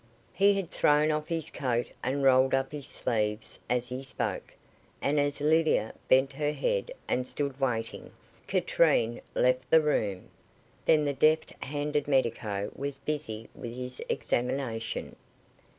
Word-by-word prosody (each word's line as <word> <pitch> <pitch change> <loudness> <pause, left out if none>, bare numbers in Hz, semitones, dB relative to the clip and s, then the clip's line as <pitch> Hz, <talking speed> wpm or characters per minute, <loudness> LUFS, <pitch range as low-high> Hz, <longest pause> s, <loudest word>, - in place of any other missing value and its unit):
He 200 +1 +4
had 195 -4 -3
thrown 150 +1 +3
off 150 0 -2
his 165 -3 -3
coat 120 -3 -1
and 135 +3 0
rolled 130 0 +5
up 135 0 -1
his 145 -2 -6
sleeves 110 -5 -2
as 125 0 0
he 125 +1 -4
spoke, 135 - -4 0.4
and 145 +1 +1
as 145 0 0
Lydia 155 -7 +2
bent 130 +1 +4
her 150 -1 -1
head - - -1 0.2
and 125 0 0
stood 140 -1 -3
waiting, 115 -4 -2 0.4
Katrine 165 - +2
left 125 0 +2
the 160 - +7
room. 105 -11 -1 0.6
Then 150 -1 +4
the 145 - 0
deft 155 +3 +3
handed 145 +1 -2
medico 115 -7 0
was 140 0 -4
busy 135 -6 -4
with 120 0 -7
his 125 0 -5
examination. 120 -2 -2
135 Hz, 140 wpm, -29 LUFS, 125-150 Hz, 0.6 s, the